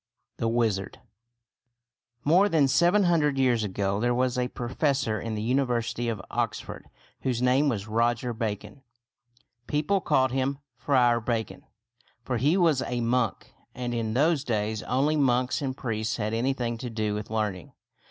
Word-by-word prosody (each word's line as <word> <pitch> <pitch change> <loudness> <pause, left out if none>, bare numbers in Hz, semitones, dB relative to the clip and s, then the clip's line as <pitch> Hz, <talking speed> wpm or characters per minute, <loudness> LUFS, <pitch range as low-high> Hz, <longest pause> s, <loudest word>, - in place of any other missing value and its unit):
THE 115 - -1
WIZARD 115 -4 0 1.2
More 180 +7 +4
than 155 -6 +3
seven 175 +8 +4
hundred 155 -6 +2
years 125 -4 +2
ago 100 0 -1
there 120 +2 +1
was 125 0 +1
a 125 -1 0
professor 125 -2 -1
in 110 -1 -4
the 105 - -3
University 120 -2 0
of 110 -3 -3
Oxford - - -3 0.3
whose 125 -3 -1
name 130 +4 +3
was 105 -5 -3
Roger 120 +2 0
Bacon. 105 +1 -5 0.9
People 155 +7 +1
called 130 -5 +2
him 135 +1 -1 0.2
Friar 125 -2 +3
Bacon; 110 -4 -3 0.6
for 125 0 -2
he 145 - +2
was 165 -7 +3
a 125 -2 -2
monk, 115 -1 -1 0.2
and 120 -1 -3
in 115 -1 -2
those 150 +1 +2
days 110 -4 -1
only 145 +4 +1
monks 130 -1 +1
and 130 -1 -3
priests 110 -3 -2
had 110 -1 -2
anything 120 -1 -1
to 125 - -5
do 110 -2 -2
with 105 0 -5
learning. 105 -5 -3
120 Hz, 150 wpm, -27 LUFS, 110-135 Hz, 1.2 s, More